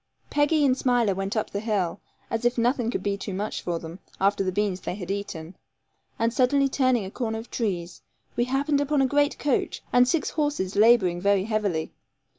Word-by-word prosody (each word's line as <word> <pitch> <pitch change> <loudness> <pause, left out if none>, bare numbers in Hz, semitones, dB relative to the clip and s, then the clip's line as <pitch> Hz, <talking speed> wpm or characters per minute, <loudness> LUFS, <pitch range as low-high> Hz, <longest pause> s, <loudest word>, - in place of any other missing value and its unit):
Peggy 295 +1 +3
and 260 -2 +4
Smiler 245 -6 +2
went 195 +3 -3
up 215 - -1
the 200 - -2
hill, 205 -4 -1 0.3
as 225 +1 -1
if 240 +1 +1
nothing 240 0 +1
could - - -3
be 200 -1 0
too 200 -1 -5
much 205 +3 -3
for 175 -1 -2
them, 165 +2 -9 0.2
after 195 +1 +2
the 185 - -1
beans 200 -1 -1
they 180 - -4
had 190 -2 -5
eaten, 185 -4 -5 0.6
and 230 0 +1
suddenly 275 +3 +3
turning 255 -5 +1
a 190 - -7
corner 225 -2 -3
of 225 +2 -9
trees, 180 -7 -3 0.3
we 240 - +1
happened 280 +3 +1
upon 285 -1 +2
a - - +4
great 290 +2 +2
coach 285 -3 -1
and 245 0 +6
six 330 +2 0
horses 290 - -1
labouring 205 -5 +4
very 200 0 +3
heavily. 205 -7 -1
220 Hz, 200 wpm, -25 LUFS, 195-255 Hz, 0.6 s, and